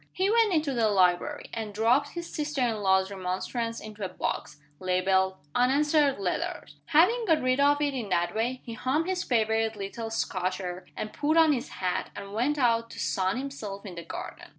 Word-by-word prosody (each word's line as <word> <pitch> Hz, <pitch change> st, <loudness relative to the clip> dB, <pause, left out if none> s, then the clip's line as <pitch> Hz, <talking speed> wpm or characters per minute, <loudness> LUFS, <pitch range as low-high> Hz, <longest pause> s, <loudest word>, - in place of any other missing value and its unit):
He 380 Hz, +2 st, +1 dB
went 455 Hz, -2 st, +4 dB
into 305 Hz, -5 st, +1 dB
the 230 Hz, -3 st, +2 dB
library, 190 Hz, +9 st, +1 dB
and 220 Hz, -3 st, -5 dB
dropped 245 Hz, +7 st, +2 dB
his 345 Hz, 0 st, -5 dB
sister 300 Hz, -1 st, -2 dB
in 235 Hz, -3 st, +1 dB
law's 190 Hz, -1 st, +2 dB
remonstrance 200 Hz, +5 st, -3 dB
into 215 Hz, -1 st, -8 dB
a 190 Hz, -, -2 dB
box, 150 Hz, -, -4 dB, 0.2 s
labeled 190 Hz, +1 st, +1 dB, 0.2 s
"Unanswered 285 Hz, +3 st, +3 dB
Letters." 180 Hz, -6 st, -3 dB
Having 400 Hz, -, +4 dB
got 320 Hz, -5 st, +3 dB
rid 255 Hz, +1 st, +2 dB
of 290 Hz, +1 st, +4 dB
it 285 Hz, -1 st, 0 dB
in 235 Hz, -6 st, -4 dB
that 175 Hz, -1 st, +1 dB
way, 245 Hz, +4 st, -1 dB
he 235 Hz, -, -7 dB
hummed 265 Hz, +8 st, 0 dB
his 370 Hz, -1 st, -1 dB
favorite 225 Hz, -2 st, +1 dB
little 210 Hz, +3 st, -5 dB
Scotch 185 Hz, -4 st, -1 dB
air 180 Hz, -1 st, -6 dB
and 215 Hz, -, -4 dB
put 310 Hz, +2 st, +1 dB
on 320 Hz, -2 st, +6 dB
his 245 Hz, -, -3 dB
hat, 180 Hz, -1 st, -2 dB
and 200 Hz, 0 st, -8 dB
went 255 Hz, +7 st, +1 dB
out 230 Hz, -3 st, +2 dB
to -, -, -10 dB
sun 190 Hz, +3 st, 0 dB
himself 220 Hz, -8 st, -6 dB
in 190 Hz, -, -7 dB
the 170 Hz, -, -6 dB
garden. 165 Hz, -, -8 dB
230 Hz, 195 wpm, -28 LUFS, 195-285 Hz, 0.2 s, on